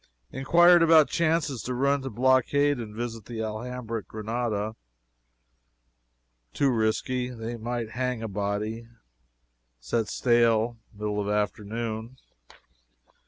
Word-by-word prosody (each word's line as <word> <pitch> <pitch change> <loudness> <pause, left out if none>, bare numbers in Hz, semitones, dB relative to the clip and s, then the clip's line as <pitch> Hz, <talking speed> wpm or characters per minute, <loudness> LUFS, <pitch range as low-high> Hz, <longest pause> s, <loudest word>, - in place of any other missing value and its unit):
Inquired 175 +6 +5
about 160 -2 +6
chances 155 -6 0
to 125 +4 -4
run 140 +2 +2
to 135 - -5
blockade 130 +4 +2
and 105 -2 -7
visit 115 -2 -5
the 115 -2 -5
Alhambra 115 +1 -4
at - - -15
Granada. 110 -1 -3 1.8
Too 140 -2 +3
risky 125 +2 0
they 115 -1 -6
might 115 0 -4
hang 125 -1 -2
a - - -2
body. 105 +3 -3 0.9
Set 100 - -1
sail 115 -1 +2
middle 105 0 -3
of 100 - -3
afternoon. 110 +3 -3
115 Hz, 115 wpm, -27 LUFS, 110-130 Hz, 1.8 s, about